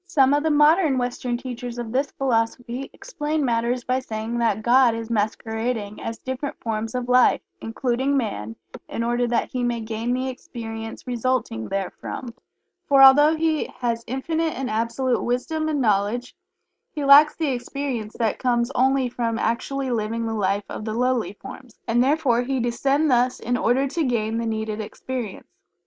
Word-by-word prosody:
Some 280 -6 +4
of 290 - +3
the 320 - +1
modern 300 0 +4
Western 245 -1 -2
teachers 245 -1 -6
of 235 -2 -5
this 270 +3 0
philosophy 245 +1 -1
explain 305 - -3
matters 240 +1 0
by 255 +2 0
saying 225 -1 -4
that 220 -2 +1
"God 245 0 +5
is 230 0 -6
masquerading 220 0 -2
as 225 0 -4
different 260 +2 -5
forms 225 0 -3
of 250 -1 -2
life, 250 0 +5 0.2
including 255 +4 0
Man, 115 - -3 0.3
in 230 - -3
order 240 +1 +1
that 235 0 0
he 250 -1 -3
may 240 -1 0
gain 225 +1 -3
the 255 +1 -1
experience 225 -3 -7
resulting 245 - -1
therefrom, 195 +5 -4 0.5
for 275 -1 +6
although 290 +4 +8
He 315 -1 0
has 235 -2 -1
Infinite 320 +6 -1
and 260 -3 -3
Absolute 235 +3 0
Wisdom 310 +6 -1
and 300 -2 0
Knowledge, 215 +1 0 0.6
he 295 -2 -2
lacks 285 +2 +8
the 315 -3 -1
experience 245 -3 -4
that 225 -3 0
comes 240 0 +1
only 265 0 +2
from 235 -2 -2
actually 260 +4 -1
living 230 0 -1
the 225 - -2
life 200 -1 0
of - - -6
the 215 0 -3
lowly 245 -6 0
forms, 255 +1 -12
and 240 +1 +3
therefore 270 -4 +2
He 265 +1 -1
descend 270 +5 +1
thus 250 +1 +2
in 245 +2 -1
order 245 +2 +2
to 330 +4 -1
gain 230 -3 0
the 230 - -2
needed 220 -1 -2
experience." 235 0 -6
245 Hz, 165 wpm, -23 LUFS, 225-265 Hz, 0.6 s, although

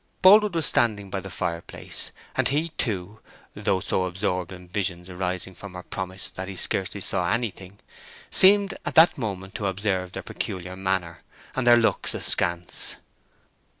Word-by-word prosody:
Boldwood 205 0 +7
was 165 - +2
standing 100 -4 +2
by 95 - -2
the 95 +1 -8
fireplace, 85 -1 -3 0.2
and - - +2
he, 150 +5 0
too, 105 - -3 0.3
though 95 - 0
so 95 0 -1
absorbed 90 -1 -2
in 90 -1 -10
visions 90 -1 -3
arising 90 +1 -3
from 90 +1 -11
her 90 - -7
promise 95 0 -6
that 95 0 -6
he 100 - -6
scarcely 95 +2 0
saw 90 -2 0
anything, 100 -4 -3 0.5
seemed 200 +1 +6
at - - -4
that 160 +1 +7
moment 95 -6 -5
to 105 - -4
have 95 - 0
observed 95 -2 -2
their - - -5
peculiar 90 0 -5
manner, 95 -3 -2 0.3
and 130 -2 -1
their 120 0 +8
looks 115 - +1
askance. 85 0 +1
95 Hz, 160 wpm, -25 LUFS, 90-110 Hz, 0.5 s, their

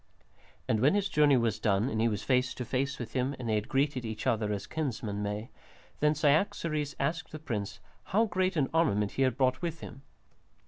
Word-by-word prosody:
And 110 - +2
when 140 - +4
his 200 -1 +1
journey 145 -3 +4
was 115 -2 0
done 105 +1 +2
and 110 -5 -1
he 115 - +3
was 105 -2 -2
face 130 +2 +1
to 125 - -4
face 135 +3 -1
with 115 -2 -7
him 130 +2 0
and 125 - -5
they 110 - +1
had 105 0 -1
greeted 135 -2 +1
each 110 -1 -5
other 110 -2 +1
as 105 0 -3
kinsmen 120 -9 -3
may, 105 +3 -4 0.5
then 150 +1 +3
Cyaxares 155 -1 +1
asked 160 +5 -2
the 155 - -6
prince 105 -9 -4 0.3
how 220 +4 +2
great 185 -2 0
an 140 -4 +2
armament 105 -12 +2
he - - -3
had 130 -3 +2
brought 130 -1 +2
with 165 -2 -3
him? 135 - -9
130 Hz, 210 wpm, -30 LUFS, 110-150 Hz, 0.5 s, when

